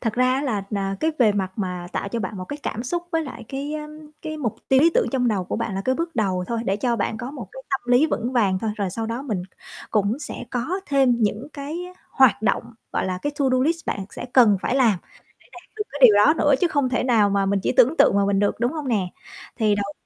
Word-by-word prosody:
Thật 225 -3 -1
ra 255 +2 +2
á 270 - -1
là, 220 -8 -1
à, 195 -1 -1
cái 320 - +2
về 220 -5 +5
mặt 190 -2 -2
mà 180 -3 -3
tạo - - -2
cho 230 +3 -3
bạn 195 +1 -4
một 185 - -5
cái 290 - -6
cảm 230 - -3
xúc 345 +7 -2
với 325 0 +1
lại 240 -6 -8
cái, 280 +3 -4
ơm, 300 0 -6 0.3
cái 310 0 -5
mục 245 -8 -3
tiêu 265 0 +5
lý 330 +3 +5
tưởng - - +3
trong 250 -2 +2
đầu 200 -5 0
của - - -3
bạn 195 - -3
là 195 - -2
cái 260 - +2
bước 330 +1 -4
đầu 185 -4 0
thôi, 230 -1 -2
để 195 -1 0
cho 235 +2 0
bạn 220 - -1
có 240 +3 -5
một 295 - -8
cái - - -9
tâm 270 - 0
lý 255 +6 +5
vững 250 -5 -2
vàng 200 -7 +2
thôi. 220 +2 -2
Rồi 200 -3 -2
sau 225 +4 -3
đó 230 +3 -4
mình 215 -10 -3 0.5
cũng 210 +3 +1
sẽ 300 - -7
có 270 +10 -2
thêm 270 -4 +3
những 215 +6 -1
cái 290 +3 -5 0.3
hoạt 260 -5 +4
động, 220 - +1 0.3
gọi - - 0
là, 185 -1 -2
cái 290 - -1
to 280 - +1
do 255 - +3
list 330 +3 -1
bạn 195 - -2
sẽ - - -7
cần 230 -6 +6
phải 250 - 0
làm 230 -8 +3
để - - -31 0.5
đạt - - -15
được 420 - -2
cái 285 - -6
điều 220 -4 +9
đó 250 +10 +6
nữa. 290 -2 +4
Chứ 355 - +3
không 285 -5 +1
thể 250 0 0
nào 220 -5 +3
mà 200 0 +1
mình 195 0 +1
chỉ - - +1
tưởng 270 +8 +5
tượng 200 - +5
mà 200 - +3
mình 200 -1 +1
được, 205 +2 0
đúng 240 +2 +1
hông 300 -4 -4
nè? 205 -6 +1 0.5
Thì 215 -3 +2
đầu 200 0 -3
235 Hz, 275 wpm, -23 LUFS, 205-280 Hz, 0.5 s, điều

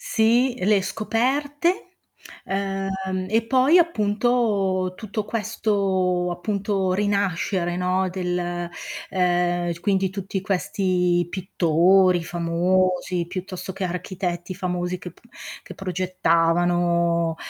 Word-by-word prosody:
Sì, 245 - +2
le 200 -2 +3
scoperte, 285 - -1 0.6
ehm, 195 -1 -3
e 225 +2 +2
poi 265 +7 +5
appunto 210 - +1
tutto 215 0 -4
questo, 195 -5 0
appunto, 195 +1 -1
rinascere, 190 -3 0
no, 185 +1 +1
del 175 -1 -2 0.4
ehm, 175 -1 +1
quindi 190 0 +1
tutti 195 0 -4
questi 180 -2 0
pittori 180 0 +3
famosi 175 +1 0
piuttosto 185 0 -6
che 190 0 -4
architetti 180 0 -4
famosi 180 0 -2
che 180 -1 -9
p - - -25 0.4
che - - -11
progettavano, 170 -2 +1
185 Hz, 95 wpm, -23 LUFS, 175-205 Hz, 0.6 s, poi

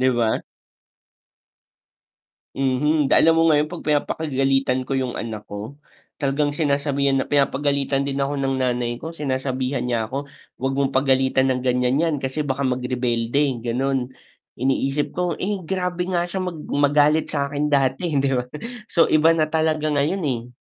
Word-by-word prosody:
Di 130 0 +4
ba? 120 -2 0 2.1
Mhm, 135 +2 +1
alam 165 0 +5
mo 165 0 +4
ngayon 150 0 +3
'pag 175 +2 -8
pinapakagalitan 135 -3 0
ko 135 - -2
yung 130 -2 -2
anak 110 -2 -5
ko, 105 +6 -6 0.5
talagang 145 +1 +1
sinasabihan 140 -2 +1
na - - -1
pinapagalitan 140 -1 +1
din 140 - -2
ako 140 +1 -1
ng 135 0 0
nanay 120 -1 0
ko, 160 +7 -7
sinasabihan 130 -3 -2
niya 120 -3 -1
ako, 140 +3 -5 0.3
huwag 135 0 0
mong 135 -1 0
pagalitan 130 0 +2
ng 130 0 -1
ganyan 125 +2 +2
'yan, 165 -2 +1
kasi 140 +3 -2
baka 135 +1 -1
mag-rebelde, 125 +1 0
ganon. 130 +2 -1 0.4
Iniisip 135 +3 0
ko 180 -1 -1
eh, 190 -3 -3
grabe 180 -1 -2
nga 180 -2 0
siya 190 - -3
mag 175 - -3 0.2
magalit 145 +2 +3
sa 140 -2 -2
akin 145 +1 -1
dati 140 +3 +1
hindi 135 0 +2
ba 125 -2 0 0.4
so 165 - +3
iba 160 +2 +5
na 155 -1 +1
talaga 155 -1 +1
ngayon 150 +7 0
eh. 120 -6 -2
140 Hz, 155 wpm, -22 LUFS, 130-150 Hz, 2.1 s, alam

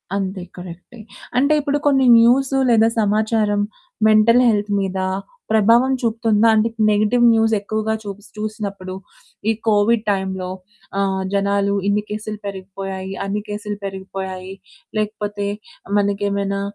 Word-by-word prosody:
అంతే 190 -1 -3 0.2
కరెక్టే. 180 +6 -10 0.4
అంటే 280 +4 +3
ఇప్పుడు 290 0 0
కొన్ని 270 -2 +4
న్యూసు 265 +4 +3
లేదా 225 -1 +5
సమాచారం 210 0 +1 0.5
మెంటల్ 220 +3 +5
హెల్త్ 210 -2 +1
మీద 190 -1 -2 0.5
ప్రభావం 230 +4 +4
చూపుతుందా? 225 -2 +2
అంటే 220 +1 +3 0.2
నెగెటివ్ 215 +3 +2
న్యూస్ 225 0 +2
ఎక్కువగా 215 +2 -2
చూస్ 200 0 -8
చూసినప్పుడు. 205 -3 -5 0.6
ఈ - - +5 0.2
కోవిడ్ 215 +1 +3
టైమ్‌లో 190 -2 -2 0.5
ఆహ్, 195 -1 0
జనాలు 200 0 +1
ఇన్ని 205 +1 +1
కేసులు 215 0 -5
పెరిగిపోయాయి, 190 0 -6
అన్ని 205 +1 -2
కేసులు 205 0 -4
పెరిగిపోయాయి, 190 -1 -6 0.4
లేకపోతే 210 -1 -2 0.5
మనకేమైనా 200 -1 0
205 Hz, 115 wpm, -20 LUFS, 195-220 Hz, 0.6 s, లేదా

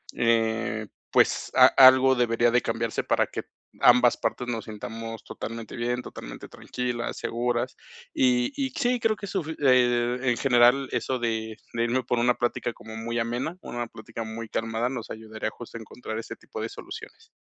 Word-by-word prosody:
eh, 115 -1 +1 0.2
pues, - - +3
a-algo 130 0 +8
debería 120 -1 +2
de 125 +1 +3
cambiarse - - -2
para - - +2
que - - -5 0.4
ambas 125 0 +6
partes 120 +1 -2
nos 115 -2 -3
sintamos 115 +1 -7
totalmente 115 -1 -7
bien, 120 +1 -1
totalmente - - -9
tranquilas, 125 -1 -4
seguras, 120 0 -1 0.4
y 125 -1 +2
y 275 -2 -1
sí, 245 0 +1
creo 225 -2 +2
que 205 - -8
eso, 190 0 -1 0.2
e 125 -2 +3
e 130 - +2
en 120 - 0
general, 125 +1 +4
eso 130 - -1
de 110 -2 -2 0.2
de 115 0 0
irme 125 +2 +1
por 120 0 0
una 120 +1 +3
plática 120 0 -1
como 110 0 -11
muy 115 +1 -3
amena, 120 +9 -2
una 120 -1 -4
plática 115 +1 -8
muy 110 0 -7
calmada, 115 +2 -1
nos 120 -3 -6
ayudaría 110 0 -5
justo 120 -1 -9
a - - -9
encontrar 110 0 -6
ese 115 - -7
tipo - - -8
de - - -3
soluciones. - - -10
120 Hz, 170 wpm, -26 LUFS, 115-125 Hz, 0.4 s, a-algo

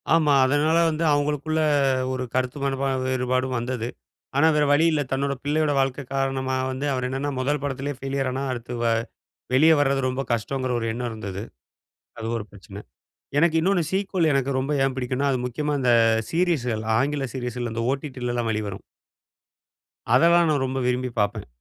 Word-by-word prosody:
ஆமா. 155 -3 +3
அதனால 145 +4 +2
வந்து 160 +1 -2
அவங்களுக்குள்ள 150 +2 0 0.5
ஒரு 130 0 -2
கருத்து 130 +2 -1
மனப்பா 135 0 0 0.2
வேறுபாடும் 130 0 0
வந்தது. 120 -1 -3 0.5
ஆனா 160 - +5
வேற 150 -1 +3
வழி 160 +3 +4
இல்ல. 155 -2 +1
தன்னோட 140 +1 0
பிள்ளையோட 150 +1 +1
வாழ்க்கை 135 +1 0
காரணமா 135 -1 -1 0.2
வந்து, 130 +3 -3
அவரு 130 -1 -1
என்னன்னா 135 +2 -2
முதல் 145 +2 0
படத்திலே 140 0 -3
ஃபெய்லியரானா 135 -1 -2
அடுத்து 120 0 -5
வ - - +1 0.7
வெளிய 155 +5 +6
வர்றது 135 -1 +2
ரொம்ப 130 +1 -2
கஷ்டங்கிற 130 +3 -2
ஒரு 115 - -3
எண்ணம் 120 +1 -3
இருந்தது. 100 -3 -6 0.8
அது 115 0 -4
ஒரு 110 - -4
பிரச்சனை. 100 0 -12 0.6
எனக்கு 165 0 +3
இன்னொன்னு 180 +1 +2
சீக்வல் 190 -4 +1
எனக்கு 135 0 +1
ரொம்ப 135 +3 -2
ஏன் 135 -1 0
பிடிக்கும்னா, 130 +2 -1
அது 130 - 0
முக்கியமா 150 +4 -2
இந்த 125 -2 +4 0.4
சீரிஸுகள் 145 -11 0 0.2
ஆங்கில 140 0 0
சீரீஸ்கள்ல 125 -2 -4
இந்த 115 - -2
ஓடிடிலாம் 125 -4 -3
வெளிவரும். 105 -3 -4 1.3
அதெல்லாம் 170 +5 +5
நான் 145 -3 +1
ரொம்ப 130 +1 -2
விரும்பி 125 0 0
பார்ப்பேன். 105 0 -1
135 Hz, 155 wpm, -24 LUFS, 125-145 Hz, 1.3 s, வெளிய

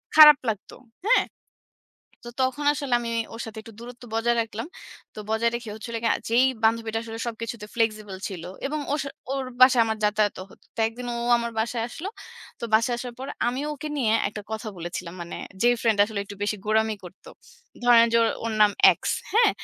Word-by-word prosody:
খারাপ 300 -2 +11
লাগতো। 210 -3 -5 0.3
হ্যাঁ? - - +5 1.0
তো - - -6
তখন 275 +3 -1
আসলে 280 -4 -1
আমি 235 -1 -4 0.2
ওর 230 - -7
সাথে 220 -1 -9
একটু 225 - -12
দূরত্ব 240 +1 -10
বজায় 235 +1 +2
রাখলাম। 225 +2 -6 0.5
তো - - -11
বজায় 225 +1 +2
রেখে 235 -2 -5
হচ্ছিল 230 +2 -8
গিয়ে 230 - +4 0.2
যেই 235 +3 +4 0.2
বান্ধবীটা 225 0 +1
আসলে 225 -1 -7
সবকিছুতে 230 -1 -5
flexible 215 -4 -1
ছিল। 180 -4 -7 0.2
এবং 300 +2 -2
ওর 300 - +1
স 280 - -7 0.3
ওর 270 - -2 0.2
বাসায় 255 -2 +7
আমার 220 0 -1
যাতায়াতও 210 -2 +1
হতো। - - -19
তো - - -22
একদিন 245 +2 -8
ও - - -3 0.2
আমার 235 0 -3
বাসায় 230 0 -1
আসলো। 325 +10 -6 0.5
তো - - -3
বাসায় 230 +2 +3
আসার 245 -1 -6
পর 265 - -6 0.2
আমি 255 +2 -2
ওকে 300 +1 -6
নিয়ে 225 -5 +2 0.2
একটা 210 0 -7
কথা 220 0 -4
বলেছিলাম। 175 0 -6
মানে 170 - -7 0.3
যেই 245 0 +5
ফ্রেন্ড 220 -3 +2
আসলে 210 -1 -5
একটু 200 0 -10
বেশি 210 +1 0
গোরামি 220 0 +2
করতো। 180 - -12 0.5
ধরেন 235 -1 +7
যে 230 - +6 0.3
ওর 230 - -1
নাম 210 - +5 0.3
X। - - -73 0.3
হ্যাঁ? 460 +3 +5
230 Hz, 190 wpm, -25 LUFS, 215-245 Hz, 1.0 s, খারাপ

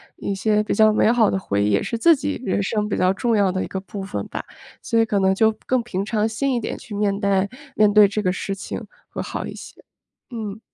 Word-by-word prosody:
一 200 - -3
些 210 +2 +1
比 215 - -2
较 215 +1 +5
美 215 +1 +3
好 230 -4 +4
的 - - 0
回 100 - -1
忆， 105 - +2
也 100 -1 +2
是 230 - -3
自 335 +5 +6
己 285 -1 -4
人 205 - 0
生 210 +1 -1
比 - - -1
较 185 +1 +3
重 230 +4 0
要 200 -3 +3
的 185 0 -2
一 - - -5
个 190 - -4
部 195 +1 -8
分 195 +1 -5
吧。 - - -5 0.4
所 230 - 0
以 225 - +4
可 210 -2 0
能 190 0 +3
就 220 +2 +4 0.2
更 255 -2 +1
平 195 -5 -3
常 215 +1 0
心 255 +4 -1
一 - - +1
点 220 - -4
去 230 -6 -9
面 200 -1 0
带 200 -1 +1 0.3
面 210 -1 +4
对 210 -1 +7
这 210 +1 -3
个 185 - +2
事 195 +1 -4
情 190 - -7 0.2
会 - - -5
好 - - -5
一 - - -7
些， - - -11 0.6
嗯。 220 -3 -5
210 Hz, 280 characters per minute, -22 LUFS, 195-225 Hz, 0.6 s, 对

